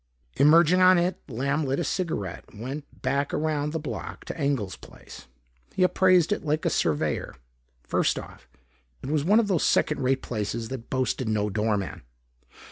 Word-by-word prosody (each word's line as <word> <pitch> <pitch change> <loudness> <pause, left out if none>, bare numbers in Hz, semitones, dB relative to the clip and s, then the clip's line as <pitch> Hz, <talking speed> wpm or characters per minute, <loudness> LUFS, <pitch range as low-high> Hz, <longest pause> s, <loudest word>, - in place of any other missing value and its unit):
Emerging 165 +5 +5
on 185 0 +7
it, 175 +2 0
Lamb 140 +5 -1
lit 135 0 -1
a - - 0
cigaret 155 - -3
and 105 - -14
went 140 +5 -8
back 140 +2 0
around 150 -1 -1
the 160 - -2
block 150 - -6
to - - -6
Engel's 140 - -1
place. - - -14 0.5
He 185 - +2
appraised 185 -2 +4
it - - -1
like 155 0 -1
a - - +2
surveyor. 75 -3 -1 0.5
First - - 0
off, - - -10 0.5
it 135 - -4
was 150 -2 +1
one 205 +7 +5
of 225 - +1
those 185 -6 +1
second 150 - +2
rate 130 +1 +1
places 110 0 -3
that 130 -3 -7
boasted 130 -2 -1
no 105 -1 0
doorman. 105 -4 -1
140 Hz, 170 wpm, -26 LUFS, 115-160 Hz, 0.5 s, on